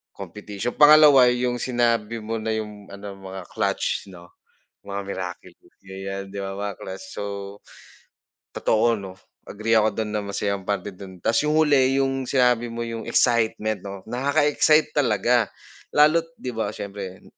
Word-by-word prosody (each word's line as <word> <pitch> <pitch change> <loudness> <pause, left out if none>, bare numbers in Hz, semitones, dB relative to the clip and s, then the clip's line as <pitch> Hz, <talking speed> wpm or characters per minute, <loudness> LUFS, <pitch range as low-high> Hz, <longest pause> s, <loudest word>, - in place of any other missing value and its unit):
Competition. 105 +4 -6
Pangalawa 150 -4 +8
yung 125 0 0
sinabi 115 -2 0
mo 115 +1 -3
na 110 0 -2
yung 105 -2 -6
ano 100 0 -9
mga 95 -1 -8
clutch - - -1
no, 85 -1 -14 0.5
mga 100 0 -4
miraculous, 95 -2 -8
ganyan 95 0 -7
'di 100 - -9
ba 95 0 -4
mga 100 0 -4
clutch. 95 0 -8
So 105 - -3 1.3
totoo 115 +1 +2
no, 95 -1 -8 0.3
agree 110 +2 +1
ako 110 0 +1
dun 110 -1 -2
na 105 - -1
masayang 100 -1 -3
parte 100 0 -2
dun. 95 -1 -12
Ta's 115 - +2
yung 155 - +1
huli 135 -3 +4
yung 135 -1 -2
sinabi 125 -3 +2
mo 115 0 -4
yung 115 -1 -6
excitement 110 -3 +1
no, 100 -1 -8
nakaka-excite 145 +4 +3
talaga. 120 -4 +2 0.5
Lalo't 155 +3 +5
'di 125 - -5
ba 110 -2 -3
siyempre, 100 -2 -7
110 Hz, 150 wpm, -24 LUFS, 100-125 Hz, 1.3 s, Pangalawa